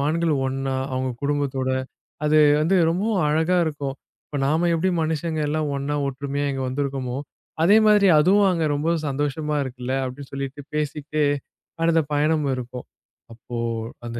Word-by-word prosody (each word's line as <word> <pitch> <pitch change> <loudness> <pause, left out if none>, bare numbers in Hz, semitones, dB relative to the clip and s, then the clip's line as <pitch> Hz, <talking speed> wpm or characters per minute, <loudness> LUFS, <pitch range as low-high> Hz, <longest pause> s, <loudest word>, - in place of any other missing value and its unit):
மான்கள் 160 +3 +1
ஒன்னா 135 0 -2 0.2
அவங்க 130 0 -1
குடும்பத்தோட, 140 -2 -1 0.6
அது 155 +1 +4 0.2
வந்து 170 +5 +3
ரொம்ப 180 +4 -1 0.2
அழகா 160 +4 +2
இருக்கும். 145 -3 -3 0.3
இப்பொழுது 140 -2 -3
நாம் 160 +4 +2
எப்படி 185 +3 +1
மனிதர்கள் 155 -1 -1
எல்லாம் 150 0 -1
ஒன்னா 140 +1 -2
ஒற்றுமையா 140 +1 -3
இங்கு 135 -1 -2
வந்துருகோமோ, 135 -1 -2 0.5
அதே 205 +5 +7
மாதிரி 205 -2 +5
அதுவும் 195 +5 +5
அங்கே 165 -3 0
ரொம்ப 150 +3 0 0.2
சந்தோஷமாக 145 +1 -1
இருக்கில்ல! 125 -1 -5
அப்படின்னு 130 +2 -7
சொல்லிட்டுப் 140 +1 -6
பேசிக்கிட்டே 150 0 -1 0.6
அடுத்த 165 0 +4 0.2
பயணம் 150 0 +2
இருக்கும். 125 0 -7 0.5
அப்போ 120 +1 -8 0.5
அந்த 120 0 -5
145 Hz, 140 wpm, -23 LUFS, 135-160 Hz, 0.6 s, அதே